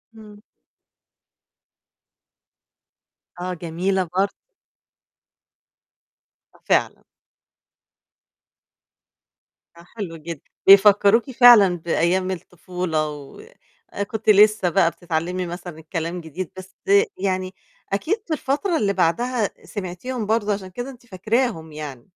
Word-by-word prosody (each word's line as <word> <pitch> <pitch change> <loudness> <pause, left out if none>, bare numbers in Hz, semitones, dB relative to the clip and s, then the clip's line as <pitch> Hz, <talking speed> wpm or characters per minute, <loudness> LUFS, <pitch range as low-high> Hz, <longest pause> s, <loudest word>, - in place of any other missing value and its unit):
إمم. 210 -2 -14 3.0
آه، 180 +1 -3
جميلة 180 +3 -1
برضو. 195 +1 +2 2.2
آه، - - -22
فعلًا. - - +1 2.7
آه، 170 - -14
حلو 195 -7 -5
جدًا، 160 -1 -8 0.3
بيفكّروكِ 205 +5 +6
فعلًا 235 -7 +7
بأيام 170 +3 0
الطفولة، 180 -3 -3
و 145 - -10 0.7
كنتِ 220 0 -3
لسّه 210 -2 +5
بقى 165 0 +3
بتتعلّمي 175 +2 -3
مثلًا 175 -1 -8
الكلام 165 +2 -4
جديد، 165 +2 -7
بس 185 0 -11 0.4
يعني 185 -1 -2 0.4
أكيد 315 - 0
في 325 - -2
الفترة 310 +5 -1
اللي 200 -1 +1
بعدها 215 +6 0 0.2
سمعتيهم 210 +5 -5
برضه 215 -1 +1
عشان 195 -2 -6
كده 245 +8 -6
أنتِ 245 -2 -14
فاكراهم 210 -4 -2
يعني. 145 -5 -8
185 Hz, 95 wpm, -22 LUFS, 170-215 Hz, 3.0 s, فعلًا